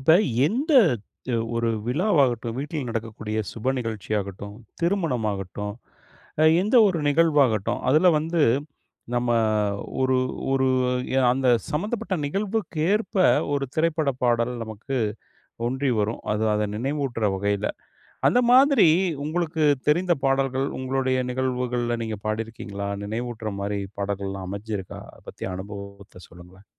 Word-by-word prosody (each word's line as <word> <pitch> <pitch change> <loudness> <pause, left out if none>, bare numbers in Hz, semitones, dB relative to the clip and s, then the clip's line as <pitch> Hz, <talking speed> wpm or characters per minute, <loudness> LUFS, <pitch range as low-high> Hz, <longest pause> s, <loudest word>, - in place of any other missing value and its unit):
இப்ப 135 +5 +4 0.3
எந்த 265 - -1 0.6
த் - - 0 0.2
ஒரு 115 0 0 0.2
விழாவாகட்டும், 130 - +1
வீட்டில் 145 -1 -4
நடக்கக்கூடிய 110 -1 -4
சுப 115 +3 -1
நிகழ்ச்சியாகட்டும், 105 -3 -4 0.3
திருமணமாகட்டும், 110 - -1 0.7
அ - - +6 0.2
எந்த 215 +6 +2
ஒரு 180 -3 -1
நிகழ்வாகட்டும். 145 -9 +2
அதில 155 +6 +5
வந்து 165 +2 -1 0.7
நம்ம 120 0 0 0.7
ஒரு 130 0 +3 0.4
ஒரு 135 0 +2 0.5
ய 135 - +3
அந்த 130 0 0 0.2
சம்மந்தப்பட்ட 195 +4 -2
நிகழ்வுக்கேற்ப 200 +1 -1 0.4
ஒரு 140 -1 0
திரைப்பட 160 -2 +1
பாடல் 120 0 +2
நமக்கு 110 +5 -4 0.7
ஒன்றி 130 +2 0
வரும், 105 +2 -1
அது 105 +1 0
அத 105 0 0
நினைவூட்டுற 130 -2 -1
வகையில. 100 +1 -1 0.6
அந்த 245 - +4
மாதிரி 265 - +6 0.4
உங்களுக்கு 160 0 -1 0.2
தெரிந்த 175 +4 +3
பாடல்கள், 135 0 +1
உங்களுடைய 130 0 0
நிகழ்வுகள்ல 125 -2 -1
நீங்க 110 -1 -4
பாடியிருக்கீங்களா? 110 -2 -4 0.2
நினைவூட்டுற 110 0 -4
மாரி 100 0 -2 0.2
பாடல்கள்லாம் 100 -1 -3
அமஞ்சிருக்கா? 100 -1 -5
அதை - - -18
பத்திய 95 - -6
அனுபவத்தை 100 -1 -9
சொல்லுங்க. 90 +3 -16
125 Hz, 110 wpm, -24 LUFS, 105-155 Hz, 0.7 s, அ